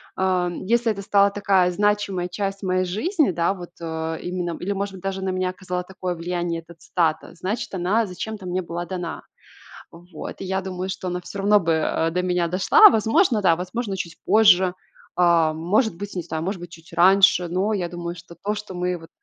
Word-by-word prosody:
а, 185 -2 +1
если 230 +6 0
это 200 -2 -5
стала 200 0 +4
такая 195 -3 +2
значимая 200 -2 0
часть 195 +1 -4
моей 185 0 +1
жизни, 295 - +1
да, 170 +3 +1
вот, 175 -2 -10
э, 160 0 -3
именно 175 -1 -3
или, 195 +3 -3
может 200 0 -3
быть, 185 - -12
даже 195 0 -3
на 190 - -1
меня 185 0 -1
оказала 180 -1 -4
такое 180 -1 -5
влияние 170 0 -3
эта 170 +1 -15
цитата, 160 -1 -1
значит, 195 +5 -4
она 190 +5 +1
зачем-то 200 +1 -6
мне 180 +1 -1
была 175 0 -5
дана. 175 -1 -5 0.7
Вот. 170 -1 -9
И - - -4
я 190 +1 -1
думаю, 185 0 -4
что 185 -1 -4
она 180 0 -3
всё 190 +3 -9
равно 205 +1 +4
бы, 165 -1 +1
э, 160 +1 0
до 180 +2 -1
меня 180 -2 0
дошла. 185 +2 +7
Возможно, 225 - +2
да, 170 -3 +5
возможно, 195 +3 -4
чуть 170 -2 -5
позже, 190 -4 +5 0.4
а, 170 -3 +4
может 175 +5 +1
быть, 205 +2 -7
не 180 - -2
знаю, 160 -1 -4
может 190 0 -3
быть, 175 -1 -9
чуть 165 0 -15
раньше, 190 0 +5
но 190 +5 0
я 180 -3 -2
думаю, 175 0 -5
что 170 0 -13
то, 205 +5 -2
что 205 -3 -7
мы 180 0 -1
вот 165 - -14
185 Hz, 205 wpm, -23 LUFS, 175-200 Hz, 0.7 s, дошла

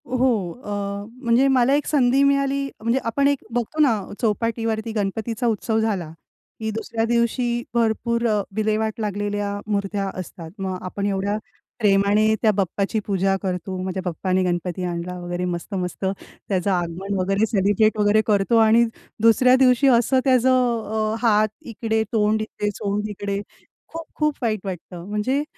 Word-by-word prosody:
हो 255 +1 +2 0.3
अ, 205 -3 -5 0.2
म्हणजे 235 +3 +4
मला 265 0 +3
एक 290 0 +1
संधी 270 -2 +3
मिळाली 275 0 +2 0.2
म्हणजे 230 +4 +1
आपण 275 +5 +2
एक 285 -1 0
बघतो 240 +6 -2
ना 240 -8 +4 0.2
चौपाटीवरती 225 0 -1
गणपतीचा 220 +3 -2
उत्सव 220 0 0
झाला 200 -7 -1 0.5
की 220 0 -2
दुसऱ्या 225 +1 -3
दिवशी 235 +1 0
भरपूर 235 0 +1
अ, 210 -2 +2
विल्हेवाट 215 +1 0
लागलेल्या 205 -1 -2
मूर्त्या 200 -1 -1
असतात. 165 -2 -8
मग 190 -1 -3
आपण 200 +2 -4
एवढ्या 200 +1 0 0.4
प्रेमाने 205 +1 +3
त्या 220 - +4
बाप्पाची 200 +3 0
पूजा 195 -1 +1
करतो, 185 0 -3
"माझ्या 190 0 -3
बाप्पाने 185 +2 0
गणपती 180 0 -2
आणला" 175 0 -4
वगैरे 175 0 -3
मस्त-मस्त 180 +1 -4
त्याचं 190 0 -3
आगमन 180 +2 -2
वगैरे 195 +3 +2
सेलिब्रेट 205 +1 +2
वगैरे 210 +1 +4
करतो 210 +2 +3
आणि 225 +1 +5 0.4
दुसऱ्या 240 +3 +5
दिवशी 255 +1 +5
असं 255 +1 +4
त्याचं 250 -4 +2 0.2
अ, - - -1
हात 215 -2 +4
इकडे, 220 -1 -1
तोंड 215 0 +2
इथे, 210 -1 -3
सोंड 205 +1 -2
इकडे, 200 -1 -3 0.5
खूप-खूप 310 -2 -2
वाईट 215 -2 0
वाटतं. 175 -2 -7
म्हणजे 255 +8 0
215 Hz, 145 wpm, -22 LUFS, 195-235 Hz, 0.5 s, आणि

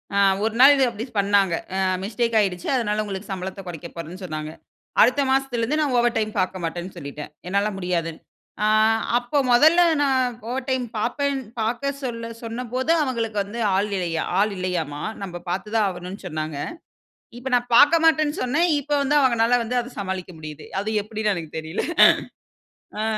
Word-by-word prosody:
ஆ - - +2 0.3
ஒரு 220 0 0
நாள் 275 +2 +9
இது 270 - +3
அப்டி 230 +1 -6
பண்ணாங்க. 200 -3 +3 0.2
அ - - 0 0.2
மிஸ்டேக் 230 +2 0
ஆயிடுச்சு 180 -4 -1
அதனால 215 -4 0
உங்களுக்கு 195 -1 -6
சம்பளத்த 190 +1 -5
கொறைக்க 170 -1 -7
போறேன்னு 170 +3 -8
சொன்னாங்க. 155 -2 -5 0.5
அடுத்த 255 +5 +5
மாசத்திலருந்து 270 0 0
நான் 275 -4 0
ஓவர் 240 0 +2
டைம் 215 -1 0
பார்க்க 185 0 -1
மாட்டேன்னு 175 +3 -4
சொல்லிட்டேன். 150 +2 -8 0.2
என்னால 200 +3 +1
முடியாது. 175 -3 -1 0.5
ஆ - - +3 0.5
அப்போ 245 +4 -2
முதல்ல 310 +8 +6 0.2
நான் 255 -3 +1
ஓவர் 260 +1 -3
டைம் 260 -1 0
பாப்பேன் 275 +5 -1 0.2
பார்க்க 240 +5 -1
சொல்ல 230 -2 -4
சொன்னபோது 250 +5 -2
அவங்களுக்கு 230 -5 -2
வந்து 210 +4 -7 0.2
ஆள் 200 +2 +1
இல்லையா 170 -3 -1 0.2
ஆள் 210 +1 +2
இல்லையாம்மா, 165 -6 -3 0.2
நம்ப 175 -2 -6
பாத்து 200 +4 -3
தான் 215 -2 +3
ஆகணும்னு 185 +2 -8
சொன்னாங்க. 155 -2 -4 0.8
இப்போ 260 +1 -5
நான் 245 0 +1
பாக்க 295 +6 +7
மாட்டேன்னு 310 -1 +3
சொன்ன, 290 +7 +1 0.2
இப்போ 295 +1 -2
வந்து 290 +2 +2
அவங்களால 245 -2 +3
வந்து 250 +2 -1
அதை 240 - -7
சமாளிக்க 190 -1 -4
முடியுது 155 -1 -9
அது 215 - -3
எப்டின்னு 215 0 -1
எனக்கு 160 -3 -7
தெரியல. 160 +3 -4 1.2
ஆ - - 0
215 Hz, 165 wpm, -23 LUFS, 185-250 Hz, 1.2 s, நாள்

